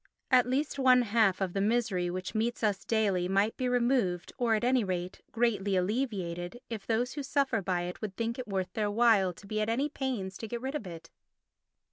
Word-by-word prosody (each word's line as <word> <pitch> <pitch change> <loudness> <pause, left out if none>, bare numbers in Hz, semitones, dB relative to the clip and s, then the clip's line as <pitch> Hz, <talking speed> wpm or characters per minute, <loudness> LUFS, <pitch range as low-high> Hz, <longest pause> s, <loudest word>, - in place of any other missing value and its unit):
At 250 -1 +5
least 280 +3 -1
one 255 -2 +6
half 215 -4 +2
of 185 -2 -1
the 195 - 0
misery 205 -5 +1
which 185 +1 -4
meets 230 +2 -1
us 205 -3 +1
daily 200 -5 +1
might 200 +3 +1
be 255 -1 -1
removed 240 -8 +1
or, 235 -3 +3
at 215 - -2
any 250 -1 +3
rate, 180 -2 -4
greatly 210 -4 +1
alleviated, 185 -2 -2
if 215 -3 -5
those 240 +3 0
who 295 - -4
suffer 275 -5 0
by 180 -2 -1
it 180 0 -6
would 205 -3 -5
think 230 +2 -2
it 255 - -5
worth 190 -2 -2
their 210 -2 0
while 210 -4 +4
to 200 - -15
be 215 +1 -2
at 215 - 0
any 270 +6 0
pains 240 -10 -4
to 225 - -5
get 235 +2 -4
rid 265 +3 -4
of 290 -10 -4
it. 165 -1 -10
220 Hz, 210 wpm, -30 LUFS, 190-245 Hz, -, one